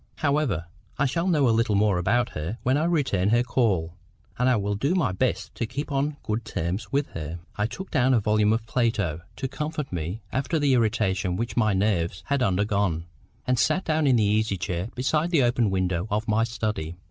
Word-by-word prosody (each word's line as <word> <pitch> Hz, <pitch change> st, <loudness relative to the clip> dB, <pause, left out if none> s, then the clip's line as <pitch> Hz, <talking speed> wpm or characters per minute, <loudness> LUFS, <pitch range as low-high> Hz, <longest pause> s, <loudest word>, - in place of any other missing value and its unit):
However, 140 Hz, -, 0 dB, 0.3 s
I 140 Hz, -, +2 dB
shall 165 Hz, +7 st, 0 dB
know 150 Hz, -7 st, +3 dB
a -, -, +4 dB
little 115 Hz, -1 st, +2 dB
more 100 Hz, -2 st, +3 dB
about 120 Hz, +7 st, +1 dB
her 80 Hz, +9 st, -5 dB
when 130 Hz, +2 st, +2 dB
I 155 Hz, +3 st, +1 dB
return 135 Hz, -, +1 dB
her 120 Hz, +2 st, +3 dB
call, 95 Hz, -11 st, 0 dB, 0.5 s
and 125 Hz, +1 st, +3 dB
I 125 Hz, -, +4 dB
will 105 Hz, -1 st, -1 dB
do 140 Hz, -, 0 dB
my 150 Hz, -, +2 dB
best 95 Hz, -, -1 dB
to 115 Hz, -, -3 dB
keep 140 Hz, +5 st, -5 dB
on 140 Hz, +2 st, 0 dB
good 110 Hz, +2 st, -2 dB
terms 95 Hz, 0 st, -3 dB
with 140 Hz, +1 st, 0 dB
her." 80 Hz, +1 st, -6 dB, 0.2 s
I 105 Hz, +1 st, 0 dB
took 190 Hz, +10 st, -8 dB
down 130 Hz, -3 st, +3 dB
a -, -, +4 dB
volume 105 Hz, 0 st, +2 dB
of 110 Hz, 0 st, 0 dB
Plato 110 Hz, -10 st, 0 dB
to 135 Hz, -, -3 dB
comfort 150 Hz, -1 st, -4 dB
me 90 Hz, +6 st, -3 dB
after 140 Hz, +5 st, 0 dB
the 145 Hz, -3 st, +2 dB
irritation 105 Hz, -6 st, +1 dB
which 115 Hz, +3 st, -3 dB
my 110 Hz, -4 st, +3 dB
nerves 90 Hz, -4 st, 0 dB
had 140 Hz, -1 st, 0 dB
undergone, 100 Hz, -5 st, +1 dB, 0.4 s
and 125 Hz, -1 st, +1 dB
sat 185 Hz, -, +2 dB
down 155 Hz, -1 st, +1 dB
in 130 Hz, -, +5 dB
an -, -, +3 dB
easy 105 Hz, -1 st, +1 dB
chair 90 Hz, +1 st, -3 dB
beside 150 Hz, +6 st, +1 dB
the 160 Hz, -7 st, +3 dB
open 120 Hz, -2 st, +2 dB
window 95 Hz, -1 st, -1 dB
of 105 Hz, +2 st, -1 dB
my 110 Hz, +1 st, +2 dB
study. 110 Hz, -8 st, -3 dB
110 Hz, 205 wpm, -25 LUFS, 100-135 Hz, 0.5 s, in